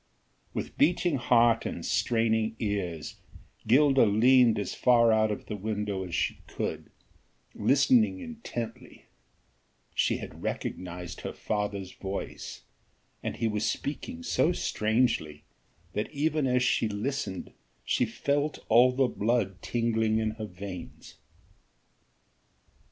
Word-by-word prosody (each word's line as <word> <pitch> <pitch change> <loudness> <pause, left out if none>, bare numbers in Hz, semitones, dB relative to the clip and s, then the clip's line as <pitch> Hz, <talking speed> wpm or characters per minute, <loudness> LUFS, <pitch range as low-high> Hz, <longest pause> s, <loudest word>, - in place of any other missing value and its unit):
With - - -5
beating 170 0 +3
heart 120 -1 +4
and - - -5
straining 110 -1 +1
ears 95 -8 -3 0.5
Gilda 135 +2 +5
leaned 120 +2 +5
as 100 - -3
far 115 -2 +4
out 110 0 +3
of 105 - -4
the 105 - -5
window 105 -1 -3
as 90 -2 -5
she - - -1
could, - - -4 0.6
listening 220 - +3
intently: 125 - -7 0.9
she - - +1
had - - -9
recognized 90 -1 -5
her - - -5
father's 100 -3 -3
voice, 95 +1 -6 0.6
and - - -3
he 115 - 0
was 105 -1 0
speaking 250 - -4
so 175 - +2
strangely 110 - 0 0.5
that 105 +2 -2
even 150 0 0
as 125 0 +2
she 115 -3 +2
listened 105 -2 -3 0.3
she - - +2
felt 145 +1 -1
all 120 +3 +6
the 135 +1 +3
blood 105 -4 -1
tingling 115 -2 +1
in 110 -1 0
her 110 0 -6
veins. 95 0 -9
115 Hz, 120 wpm, -28 LUFS, 105-130 Hz, 0.9 s, all